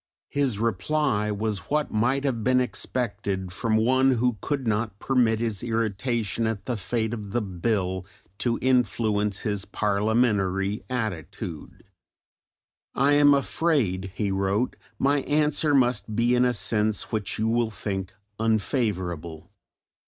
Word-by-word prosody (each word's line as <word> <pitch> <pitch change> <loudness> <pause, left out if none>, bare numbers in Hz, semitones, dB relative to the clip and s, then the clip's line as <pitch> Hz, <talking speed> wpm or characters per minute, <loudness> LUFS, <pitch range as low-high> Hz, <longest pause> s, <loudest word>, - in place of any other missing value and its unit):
His 135 -7 0
reply 115 +2 0
was 105 -3 -3
what 150 0 0
might 125 +6 +1
have 125 -6 -1
been 130 +1 +4
expected 100 -7 -2
from 110 +3 0
one 130 +4 +4
who 125 -3 0
could 140 -3 -2
not 110 -2 -1
permit 120 -3 +2
his 110 -4 -1
irritation 115 -1 -1
at 105 -3 -3
the 125 - -1
fate 110 +2 -2
of 105 -4 -6
the 120 - +1
Bill 95 -1 -1 0.3
to 120 -2 0
influence 110 -5 +1
his 105 -3 -1
parliamentary 100 -1 +1
attitude. 110 - -5 1.1
I 140 +2 +3
am 145 0 +6
afraid 130 - 0
[he 100 -3 -1
wrote] 100 +5 0 0.2
my 140 +1 +2
answer 150 +1 +2
must 120 -4 +1
be 120 +2 +3
in 125 0 +4
a 125 - +2
sense 105 -2 0
which 105 -4 -2
you 110 - 0
will 115 0 +1
think 95 -3 -4 0.3
unfavourable. 95 - -1
110 Hz, 130 wpm, -26 LUFS, 100-125 Hz, 1.1 s, am